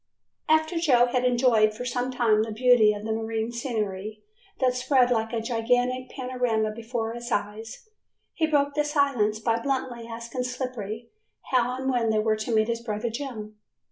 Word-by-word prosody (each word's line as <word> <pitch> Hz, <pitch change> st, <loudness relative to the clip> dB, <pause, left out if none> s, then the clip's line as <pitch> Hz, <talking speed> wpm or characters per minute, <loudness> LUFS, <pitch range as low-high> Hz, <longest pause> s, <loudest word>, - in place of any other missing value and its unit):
After 315 Hz, +2 st, +3 dB
Joe 255 Hz, -7 st, +4 dB
had 250 Hz, 0 st, 0 dB
enjoyed 240 Hz, -4 st, +3 dB
for 245 Hz, +3 st, -6 dB
some 245 Hz, +1 st, -1 dB
time 235 Hz, -4 st, +2 dB
the 220 Hz, 0 st, -2 dB
beauty 230 Hz, -1 st, +5 dB
of 205 Hz, 0 st, -5 dB
the 220 Hz, -, -2 dB
marine 225 Hz, +1 st, -2 dB
scenery 215 Hz, -4 st, -4 dB, 0.4 s
that 255 Hz, -1 st, +3 dB
spread 250 Hz, 0 st, +2 dB
like 225 Hz, -1 st, 0 dB
a 235 Hz, -, -1 dB
gigantic 245 Hz, +2 st, 0 dB
panorama 250 Hz, -4 st, -1 dB
before 225 Hz, 0 st, -4 dB
his 240 Hz, +1 st, -7 dB
eyes, 210 Hz, -, -4 dB, 0.5 s
he 320 Hz, -, +1 dB
broke 285 Hz, -2 st, +2 dB
the 295 Hz, 0 st, +1 dB
silence 280 Hz, -8 st, +1 dB
by 230 Hz, +1 st, 0 dB
bluntly 245 Hz, -2 st, -3 dB
asking 235 Hz, +2 st, -5 dB
Slippery 240 Hz, -3 st, -5 dB, 0.4 s
how 250 Hz, -1 st, +2 dB
and 265 Hz, 0 st, -4 dB
when 240 Hz, -3 st, +1 dB
they 220 Hz, -, +2 dB
were 215 Hz, 0 st, +2 dB
to 215 Hz, +2 st, -4 dB
meet 220 Hz, -1 st, +3 dB
his 235 Hz, 0 st, -2 dB
brother 225 Hz, 0 st, -3 dB
Jim. 220 Hz, -5 st, -6 dB
235 Hz, 175 wpm, -26 LUFS, 220-255 Hz, 0.5 s, beauty